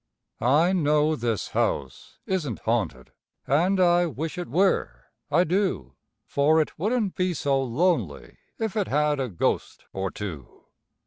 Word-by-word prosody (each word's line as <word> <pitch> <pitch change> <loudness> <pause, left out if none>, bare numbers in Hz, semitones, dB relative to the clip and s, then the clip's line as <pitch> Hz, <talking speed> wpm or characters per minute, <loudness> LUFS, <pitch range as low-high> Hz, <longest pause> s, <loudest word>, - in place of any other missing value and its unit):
I 150 +9 +3
know 150 -2 +2
this 115 -5 -2
house 65 -2 -2
isn't 160 - -2
haunted, 105 - -2 0.3
and 175 +8 +2
I 175 -1 +4
wish 160 +4 -5
it 175 - -4
were, 155 - 0 0.2
I 175 - +4
do; 180 - -1 0.3
For 150 +3 +3
it 155 - -2
wouldn't 215 +1 0
be 180 -1 0
so 135 -1 +1
lonely 130 - -1 0.2
if 220 -1 -3
it 205 -3 0
had 150 0 +1
a 130 -2 -1
ghost 90 - -2
or 95 0 -2
two. 85 -12 -8
150 Hz, 140 wpm, -25 LUFS, 115-180 Hz, 0.3 s, I